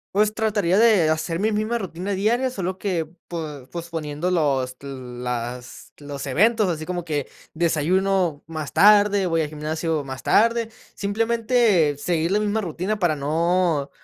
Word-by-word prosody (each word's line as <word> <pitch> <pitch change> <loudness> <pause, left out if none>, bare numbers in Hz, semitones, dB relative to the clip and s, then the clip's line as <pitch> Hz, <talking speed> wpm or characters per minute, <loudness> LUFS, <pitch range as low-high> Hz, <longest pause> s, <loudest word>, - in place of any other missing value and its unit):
Pues 210 +1 +3
trataría 205 -5 +1
de 215 -8 +5
hacer 165 +2 -1
mi 215 +1 +1
misma 215 +3 0
rutina 190 -1 -5
diaria, 230 +7 +1
solo 190 -5 -4
que 175 -6 -2 0.2
po 150 -6 -6
posponiendo 165 -1 -4
los 135 -7 0
las 125 -2 -6
los 145 -1 -6
eventos, 215 - +3
así 160 -2 -3
como 175 -1 -4
que 145 -4 -2 0.2
desayuno 170 +1 +1
más 155 -2 -6
tarde, 205 -1 +5
voy 165 -2 +1
a 155 - -1
gimnasio 155 +1 -2
más 130 -1 -7
tarde. 230 +1 +3 0.3
Simplemente 220 - +2
seguir 165 +3 -1
la 210 +1 +2
misma 210 +1 0
rutina 190 +3 -3
para 170 -5 +2
no 160 +1 0
170 Hz, 145 wpm, -23 LUFS, 150-205 Hz, 0.3 s, de